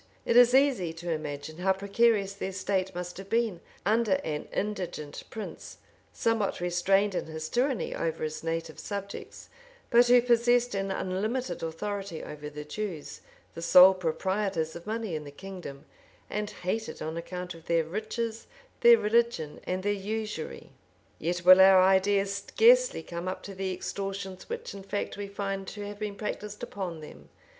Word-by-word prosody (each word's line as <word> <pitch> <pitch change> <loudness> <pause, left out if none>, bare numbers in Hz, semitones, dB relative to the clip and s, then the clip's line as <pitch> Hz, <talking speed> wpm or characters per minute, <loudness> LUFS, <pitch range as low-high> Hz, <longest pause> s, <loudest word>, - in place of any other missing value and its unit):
It - - +1
is 245 +1 +7
easy 260 - +3
to 170 +1 -5
imagine 155 0 -5
how 190 +1 +3
precarious 200 +1 +2
their 195 -1 -5
state 190 -1 -1
must 180 0 -5
have 195 +1 -9
been 225 -5 0 0.2
under 220 0 +3
an 150 -1 -3
indigent 180 -8 -4
prince, 220 - -8 0.3
somewhat 225 -4 0
restrained 190 +3 +2
in 180 - -2
his 160 0 -5
tyranny 250 -4 0
over 165 -1 -2
his 155 0 -3
native 165 0 -3
subjects, 200 -1 -6 0.4
but 240 0 +6
who 245 0 +7
possessed 240 0 +3
an 195 0 -1
unlimited 195 +3 -2
authority 195 +1 -4
over 150 0 -7
the 150 0 -8
Jews, 170 -1 -5 0.3
the 165 - -7
sole 180 +2 +8
proprietors 185 -1 -1
of 170 +3 -9
money 220 -3 -3
in 155 -1 -3
the 145 - -9
kingdom, 160 -3 -9 0.5
and 210 0 -2
hated 215 +5 -4
on 160 +1 -4
account 180 +2 -5
of 165 -1 -15
their 170 -1 +3
riches, 220 +6 -4 0.3
their 475 -1 +8
religion, 230 - +1
and 185 +1 -2
their 205 +1 +1
usury; 210 -3 -5 0.5
yet 175 +2 -2
will 185 +1 +10
our 190 0 +8
ideas 195 +1 +3
scarcely - - +4
come 170 +1 -6
up 185 - -4
to 200 - -7
the 190 0 -3
extortions 195 - -5
which 475 +1 -5
in 200 - -8
fact 195 +1 -3
we 205 0 -5
find 195 -1 -4
to 205 +1 -6
have 205 0 -7
been 210 -2 -3
practised 210 0 -5
upon 180 -5 -5
them. 150 - -12
195 Hz, 165 wpm, -28 LUFS, 170-215 Hz, 0.5 s, will